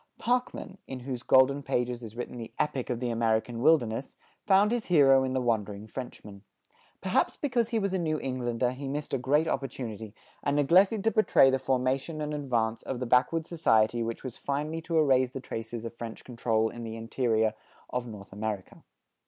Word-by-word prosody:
Parkman, 245 -5 -2
in 130 -1 -6
whose 125 -1 -5
golden 130 +2 +4
pages 125 -2 -1
is 115 -2 -9
written 120 0 -5
the 115 - -7
epic 150 -4 -1
of 120 -2 -1
the 125 -1 -1
American 115 +1 0
wilderness, 135 -5 +2 0.3
found 200 +2 +5
his 240 -2 -1
hero 135 -6 +6
in 130 0 -1
the 130 - +1
wandering 105 -4 -1
Frenchman. 105 -4 -8 0.6
Perhaps 185 - +1
because 245 -5 0
he 230 - 0
was 200 -3 0
a 190 - +1
New 155 -2 0
Englander 125 -2 -1
he 135 +2 -6
missed 145 +2 -4
a 135 - +1
great 145 +5 +2
opportunity 115 -7 -4 0.3
and 140 0 0
neglected 185 +8 +4
to 225 - +3
portray 215 - +5
the 130 - +1
formation 130 +4 -1
and 150 0 -3
advance 120 -6 -1
of 130 - -4
the 125 - -2
backwood 125 +7 +2
society 120 -9 +2
which 115 0 -4
was 130 -3 -6
finally 150 +3 -3
to 165 0 -1
erase 130 -4 +4
the 135 - -6
traces 115 -2 -6
of 115 - -5
French 115 -1 -7
control 115 -2 0
in 120 +1 -8
the 110 -1 -5
interior 115 -1 0 0.4
of 125 -1 -2
North 100 -4 -10
America. 105 -2 -5
130 Hz, 185 wpm, -28 LUFS, 115-150 Hz, 0.6 s, hero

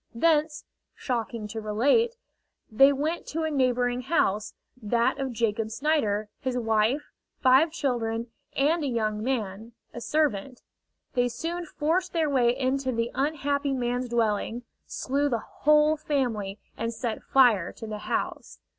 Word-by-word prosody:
Thence, 305 +2 +2 0.3
shocking 230 -3 -3
to 220 +1 -5
relate, 280 - +2 0.6
they 270 +6 +6
went 305 +5 -2
to 320 +1 -2
a 315 - -1
neighboring 250 -2 +1
house, 215 - 0 0.3
that 230 +2 +1
of 270 -1 -2
Jacob 225 -2 -1
Snider, 220 -6 0
his 255 -1 -2
wife, 225 +4 +1 0.3
five 265 +5 +5
children, 235 -7 -2 0.2
and 310 +4 +2
a - - 0
young 215 -4 -1
man, 225 -2 -3 0.2
a 240 - -7
servant. 265 -5 -1 0.5
They 245 0 +2
soon 335 +8 -4
forced 340 +5 -1
their 320 -3 +1
way 245 -2 +3
into 265 0 0
the 230 0 -1
unhappy 285 0 0
man's 245 -1 -1
dwelling, 230 0 0 0.2
slew 285 +2 -1
the 240 - +1
whole 300 +1 +3
family, 240 -10 -1 0.2
and 230 +1 -2
set 230 -1 -4
fire 235 -10 +4
to - - -9
the 215 -1 -5
house. - - -3
250 Hz, 140 wpm, -27 LUFS, 225-290 Hz, 0.6 s, they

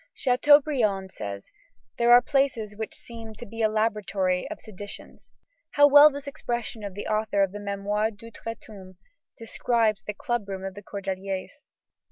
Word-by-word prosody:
Chateaubriand 250 -7 +3
says: 100 - -7 0.5
"There 235 0 +4
are 245 0 +8
places 265 -7 0
which 220 +1 -5
seem 225 -2 -10
to 240 - -9
be 225 +1 -7
the 220 - +5
laboratory 210 -2 0
of 320 - -7
seditions." 205 -1 -10 0.4
How 290 - +7
well 290 +1 +9
this 285 -1 -8
expression 240 -6 -4
of 200 -2 -6
the 205 - -6
author 215 -2 +1
of 195 - -1
the 205 - -7
Mémoires 205 +1 -2
d'Outre 230 +1 -8
tombe 190 -3 -13 0.4
describes 225 -2 0
the 210 - -6
club 240 -3 -3
room 190 -1 -5
of 195 - -5
the 205 - -10
Cordeliers! 195 -1 -5
215 Hz, 160 wpm, -26 LUFS, 200-240 Hz, 0.5 s, well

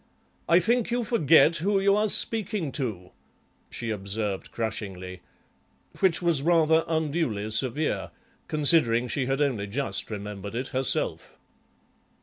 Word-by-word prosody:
'I 170 +2 +6
think 235 +4 +1
you 240 0 0
forget 165 - +4
who 195 +5 +1
you 200 +1 +3
are 210 +1 +1
speaking 210 -8 0
to,' 105 -11 -4 0.6
she 115 -2 -4
observed 100 -1 -3
crushingly, 95 -5 -5 0.8
which 180 -2 +2
was 170 -5 +2
rather 160 0 +3
unduly 155 -10 -1
severe, 130 +7 -1 0.4
considering 145 -6 +3
she 125 +2 -2
had 135 +1 -1
only 120 -8 0
just 135 +7 -3
remembered 105 0 -6
it 125 +2 -3
herself." 130 0 -2
140 Hz, 125 wpm, -26 LUFS, 110-170 Hz, 0.8 s, I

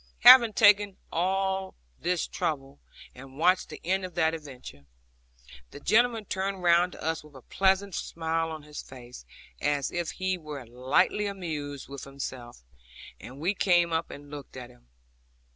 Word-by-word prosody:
Having 235 -4 +9
taken 205 -2 +4
all 190 +2 -1 0.2
this 180 -1 0
trouble, 140 -2 -4 0.3
and 135 +1 -13
watched 180 +4 +2
the - - -9
end 190 +2 0
of 180 -2 -7
that 160 -2 +2
adventure, 130 - -10 0.8
the - - -11
gentleman 225 +5 +2
turned 190 0 -3
round 175 +1 +4
to - - -11
us 160 -1 -2
with 150 -2 -17
a 130 - -13
pleasant 195 0 +1
smile 165 0 -2
on 155 -2 -7
his 150 0 -8
face, 120 - -12 0.3
as 145 -2 0
if 175 -2 -2
he 185 -1 -2
were 150 -5 -8
lightly 130 - +1
amused 155 -8 -5
with 140 0 -8
himself; 130 - -8 0.6
and 130 +3 -11
we 175 +6 0
came 175 -4 +2
up 160 +1 -1
and 145 0 -11
looked 145 -3 -9
at 125 -1 -9
him. - - -24
165 Hz, 160 wpm, -28 LUFS, 140-190 Hz, 0.8 s, Having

